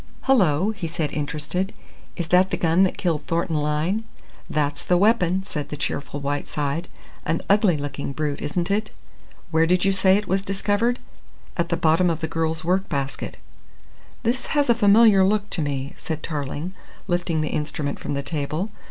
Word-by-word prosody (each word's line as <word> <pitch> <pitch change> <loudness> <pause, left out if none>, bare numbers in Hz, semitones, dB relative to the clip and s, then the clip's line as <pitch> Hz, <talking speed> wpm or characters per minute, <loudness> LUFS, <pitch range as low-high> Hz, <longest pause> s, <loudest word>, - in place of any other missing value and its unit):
"Hullo!" 195 - +3
he 195 -6 -5
said, 160 -2 -2
interested. 150 +6 -2 0.4
"Is 170 -2 -4
that 185 +1 +5
the - - -1
gun 165 +2 +3
that 185 - -2
killed 160 -4 -1
Thornton 165 -1 0
Lyne?" 150 +8 0 0.5
"That's 145 -1 -1
the 180 - +3
weapon," 190 -2 +3
said 150 -7 -5
the 150 - -5
cheerful 140 0 -3
Whiteside. 145 +3 -2 0.4
"An 165 - -1
ugly 200 -5 +4
looking 140 -1 -4
brute, 145 0 -2
isn't 170 +5 -1
it?" 215 +1 0 0.6
"Where 160 0 +4
did 180 +2 +3
you 195 - +4
say 190 0 +4
it 210 -2 -3
was 190 +1 +1
discovered?" 205 +5 +1 0.6
"At 170 -1 -1
the 170 - +1
bottom 165 +3 +3
of 165 -1 -1
the 160 - -2
girl's 160 0 -1
work 185 +3 +1
basket." 140 -1 -3 0.9
"This 245 +3 0
has 285 -4 +4
a - - +7
familiar 210 -2 +6
look 205 +1 +2
to 170 - 0
me," 140 -2 -2
said 160 -1 -5
Tarling, 150 +3 -4 0.3
lifting 175 -3 0
the 155 - -1
instrument 150 -1 -3
from - - -3
the 140 - -2
table. 155 +6 -3
170 Hz, 175 wpm, -23 LUFS, 150-195 Hz, 0.9 s, a